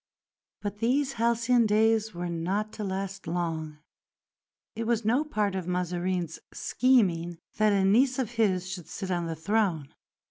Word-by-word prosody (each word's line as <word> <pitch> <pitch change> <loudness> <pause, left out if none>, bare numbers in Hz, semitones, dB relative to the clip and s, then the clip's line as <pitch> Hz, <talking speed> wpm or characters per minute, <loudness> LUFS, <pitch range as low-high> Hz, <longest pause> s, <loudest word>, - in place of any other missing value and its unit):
But 205 0 -4
these 270 +4 +1
halcyon 235 0 +2
days 220 +1 +3
were 175 -1 -4
not 185 +6 -2
to 215 - -5
last 195 -1 -4
long. 165 -3 -3 1.0
It 225 0 -3
was 230 -2 +1
no 245 +7 +3
part 215 -10 -1
of 185 -2 -4
Mazarin's 180 -1 -2
scheming 180 -10 +2 0.2
that 215 -1 +4
a 195 -1 +3
niece 250 +6 +4
of 255 -5 -1
his 195 -6 +1
should 185 -3 -6
sit 190 -1 -5
on 175 -2 -1
the 165 - -3
throne. 165 -4 0
200 Hz, 150 wpm, -28 LUFS, 175-225 Hz, 1.0 s, that